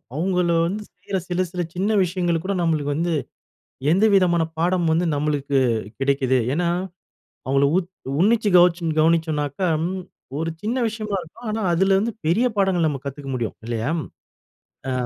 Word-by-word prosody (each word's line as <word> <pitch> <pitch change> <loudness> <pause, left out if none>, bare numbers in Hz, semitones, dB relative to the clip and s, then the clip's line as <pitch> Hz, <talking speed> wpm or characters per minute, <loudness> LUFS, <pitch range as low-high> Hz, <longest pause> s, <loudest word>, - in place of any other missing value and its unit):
அவங்கள 180 +1 +1 0.2
வந்து 210 +4 -4
செய்யற 195 - -4
சில, 180 +1 0
சில 180 -1 -3
சின்ன 190 +4 0
விஷயங்கள 175 -2 0
கூட 200 - 0
நம்மளுக்கு 150 -4 0
வந்து, 170 +2 0 0.8
எந்த 195 +6 +4
விதமான 175 -3 +3 0.2
பாடம் 175 0 +1
வந்து 170 +1 +1
நம்மளுக்கு 145 -1 0 0.4
கிடைக்குது. 135 -1 +2
ஏன்னா 170 +3 0 0.8
அவங்கள 135 +1 +3
உத் 180 -2 -1 0.3
உன்னிச்சு 215 +2 +3
கவுச்சு 175 -1 +4
கவனிச்சோம்னாக்கா, 160 0 +1 0.7
ஒரு 165 +1 -1
சின்ன 230 +5 -1
விஷயமா 215 -2 -3
இருக்கும், 225 +8 -11
ஆனா 220 +1 -2
அதில 190 +3 +3
வந்து 230 +3 -1
பெரிய 190 +11 +3
பாடங்கள் 190 -4 +2
நம்ம 140 -3 -2
கத்துக்க 140 0 -6
முடியும் 115 -3 -3
இல்லையா? 115 +2 -2 1.0
அ - - -1
170 Hz, 145 wpm, -22 LUFS, 150-190 Hz, 1.0 s, எந்த